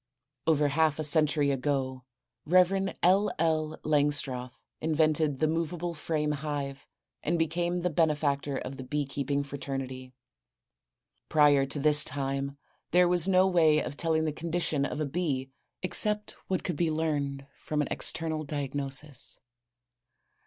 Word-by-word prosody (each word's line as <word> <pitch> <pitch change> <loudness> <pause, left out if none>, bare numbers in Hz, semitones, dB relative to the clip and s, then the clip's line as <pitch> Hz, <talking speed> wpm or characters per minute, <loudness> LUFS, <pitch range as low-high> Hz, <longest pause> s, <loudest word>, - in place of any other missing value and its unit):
Over 150 -2 +3
half 155 +1 +2
a 155 - -2
century 150 -1 +3
ago, 130 -1 -2 0.4
Rev. 185 +3 +4
L. 195 +4 +4
L. 155 -1 0
Langstroth 140 -4 0
invented 155 -2 +1
the 155 - +2
movable 165 +2 -2
frame 155 -1 -1
hive 145 -2 -4 0.3
and 170 +3 0
became 175 +2 0
the 180 0 0
benefactor 145 -3 +1
of 130 +1 -6
the 130 - -6
bee 145 +2 -2
keeping 140 +1 -2
fraternity. 135 -2 -6 1.1
Prior 145 -3 +4
to 135 - -2
this 150 +1 +5
time 140 0 -3 0.3
there 180 +1 +5
was 175 0 +3
no 185 -1 +5
way 165 -5 +4
of 145 - -2
telling 160 0 0
the 155 - -1
condition 160 -3 -1
of 145 - -4
a 155 - 0
bee 140 -4 -2 0.3
except 210 +3 +2 0.2
what 185 - -1
could 175 -5 -3
be 170 0 +1
learned 145 -3 -2
from 150 - -4
an - - -4
external 160 -1 -2
diagnosis. 140 -1 -3
150 Hz, 140 wpm, -29 LUFS, 140-165 Hz, 1.1 s, this